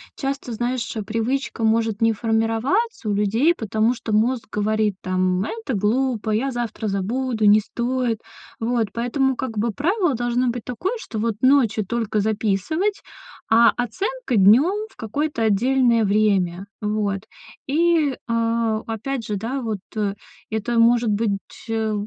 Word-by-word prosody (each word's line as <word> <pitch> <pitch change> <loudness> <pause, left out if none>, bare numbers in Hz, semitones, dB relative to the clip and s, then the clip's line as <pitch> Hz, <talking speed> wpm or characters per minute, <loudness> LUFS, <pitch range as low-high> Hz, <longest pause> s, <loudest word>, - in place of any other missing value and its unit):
часто, 275 -2 -4
знаешь, 240 +1 -2
э, 215 - -3
привычка 230 +3 -2
может 225 -1 +1
не 225 0 +4
формироваться 225 - 0
у - - +1
людей, 220 +11 +2
потому 220 -2 0
что 225 -2 -5
мозг 230 +3 +1
говорит 210 -1 0
там: 185 0 0
"Это 445 - -4
глупо, 220 +1 0
я 245 +6 +1
завтра 235 -3 -3
забуду, 220 +4 -1
не 210 +1 +7
стоит". 240 +1 -2 0.4
Вот 230 -1 0
поэтому 260 +3 0
как 230 -4 -4
бы 230 +1 0
правило 345 - +1
должно 240 +1 0
быть 240 -1 -4
такое, 365 - -3
что 220 - -6
вот 225 -1 0
ночью 245 -6 +3
только 225 -1 -1
записывать, 220 - 0 0.5
а 230 +1 +6
оценка 260 - -2
днем 300 - +4
в - - -24
какое-то 250 +2 -2
отдельное 235 +2 +3
время. 195 -3 +1 0.2
Вот. 210 -2 -1 0.5
И, 315 -1 +2
а, 230 -1 +1
опять 230 +2 -3
же, 210 - -2
да, 245 +7 -3
вот, 220 -4 -3 0.2
э, 205 -2 -1 0.3
это 225 +2 -1
может 235 0 +4
быть, 205 -1 0 0.3
э, 220 -1 0
230 Hz, 145 wpm, -22 LUFS, 215-255 Hz, 0.5 s, не